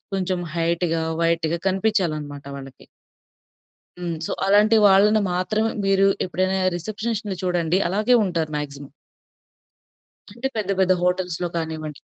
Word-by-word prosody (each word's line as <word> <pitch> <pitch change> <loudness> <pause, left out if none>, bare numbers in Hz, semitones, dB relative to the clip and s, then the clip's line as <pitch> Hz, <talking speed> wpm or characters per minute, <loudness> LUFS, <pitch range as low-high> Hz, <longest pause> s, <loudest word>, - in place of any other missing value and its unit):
కొంచెం 185 -1 -1 0.2
హైట్‌‌గా, 165 0 0 0.2
వైట్‌‌గా 165 0 0
కనిపించాలనమాట 170 -8 -1
వాళ్ళకి. 135 -1 -12 1.1
హ్మ్. 170 -2 -3
సో, - - -3
అలాంటి 210 +3 +5
వాళ్ళని 205 +2 +5
మాత్రమే 215 +5 0 0.2
మీరు 195 0 +4 0.2
ఎప్పుడైనా 185 +1 0 0.2
రిసెప్షనిస్ట్‌ని 215 +1 -4
చూడండి. 175 0 +1
అలాగే 215 +7 +2
ఉంటారు 165 -4 -2
మాక్సిమమ్. 140 -1 -7 1.4
అంటే 260 +3 -2
పెద్ద 200 -2 -2
పెద్ద 185 0 +4
హోటల్స్‌‌లో 180 -1 -1
కానివ్వండి. 160 -2 -4
180 Hz, 110 wpm, -22 LUFS, 165-200 Hz, 1.4 s, అలాంటి